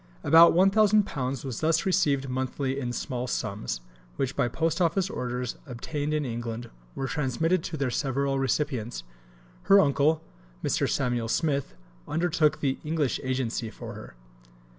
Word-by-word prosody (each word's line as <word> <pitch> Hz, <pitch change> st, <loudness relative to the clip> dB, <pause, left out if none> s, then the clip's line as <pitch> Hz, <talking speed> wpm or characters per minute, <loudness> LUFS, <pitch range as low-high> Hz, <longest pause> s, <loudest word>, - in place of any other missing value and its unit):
About 165 Hz, +2 st, +7 dB
£1000 195 Hz, -, +3 dB
was 130 Hz, -4 st, -4 dB
thus 160 Hz, +1 st, +2 dB
received 150 Hz, -8 st, +2 dB
monthly 130 Hz, +1 st, -2 dB
in 125 Hz, -3 st, -3 dB
small 125 Hz, 0 st, -3 dB
sums, 100 Hz, -, -3 dB, 0.3 s
which, 135 Hz, 0 st, -2 dB
by -, -, +2 dB
post 165 Hz, +7 st, -1 dB
office 185 Hz, +3 st, +1 dB
orders 125 Hz, 0 st, -3 dB
obtained 145 Hz, +4 st, -4 dB
in 150 Hz, -1 st, 0 dB
England, 120 Hz, -1 st, -5 dB, 0.2 s
were 135 Hz, -, -2 dB
transmitted 160 Hz, +6 st, 0 dB
to 160 Hz, -, -4 dB
their 135 Hz, -3 st, -1 dB
several 135 Hz, +1 st, 0 dB
recipients. 130 Hz, -, -1 dB, 0.7 s
Her 200 Hz, -, +9 dB
uncle, 155 Hz, +1 st, +3 dB, 0.4 s
Mr. -, -, +1 dB
Samuel 120 Hz, -3 st, 0 dB
Smith, 140 Hz, -, 0 dB, 0.3 s
undertook 160 Hz, -2 st, +1 dB
the 135 Hz, -2 st, 0 dB
English 150 Hz, -3 st, 0 dB
agency 125 Hz, -3 st, -2 dB
for -, -, -8 dB
her. -, -, -11 dB
140 Hz, 140 wpm, -27 LUFS, 125-160 Hz, 0.7 s, Her